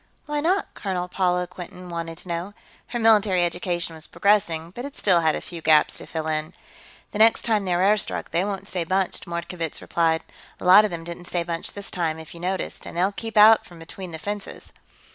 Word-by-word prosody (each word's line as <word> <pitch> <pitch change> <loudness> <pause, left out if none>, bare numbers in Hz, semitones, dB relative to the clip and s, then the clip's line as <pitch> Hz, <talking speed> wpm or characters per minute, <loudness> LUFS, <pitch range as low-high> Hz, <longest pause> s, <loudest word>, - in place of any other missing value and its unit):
"Why 295 0 -2
not?" 370 +6 0
Colonel 185 -3 -3
Paula 180 -1 +1
Quinton 180 0 -10
wanted 165 -1 -5
to 180 - -12
know. 175 +3 -4 0.3
Her 240 - -4
military 210 -5 +4
education 175 -1 -2
was 160 0 -11
progressing, 170 -5 +1
but 240 +6 -7
it 280 +1 -7
still 180 -4 +3
had 160 -1 +2
a - - -4
few 170 -2 -8
gaps 155 -1 +4
to - - -9
fill 160 -1 -4
in. 155 +1 -2 0.6
"The 210 - -5
next 225 +1 +5
time 215 -4 +1
they're 180 0 +1
air 210 +2 +5
struck, - - -2
they 170 - +1
won't 195 -1 -4
stay 180 -2 -2
bunched," 185 +2 -1
Mordkovitz 170 -1 -4
replied. 165 -1 +1 0.4
"A - - -8
lot 195 +4 +8
of - - -1
them 170 -2 -6
didn't 170 +1 -8
stay 175 -1 -1
bunched 170 -1 -4
this 200 -1 -7
time, 165 -3 -1
if 160 -1 -10
you 170 - -11
noticed. 185 +2 -3
And - - -8
they'll 185 +3 +2
keep 225 +2 -6
out 215 +1 +8
from 175 - -15
between 175 +3 -9
the 160 - -6
fences." 205 +4 -6
180 Hz, 220 wpm, -24 LUFS, 170-200 Hz, 0.6 s, lot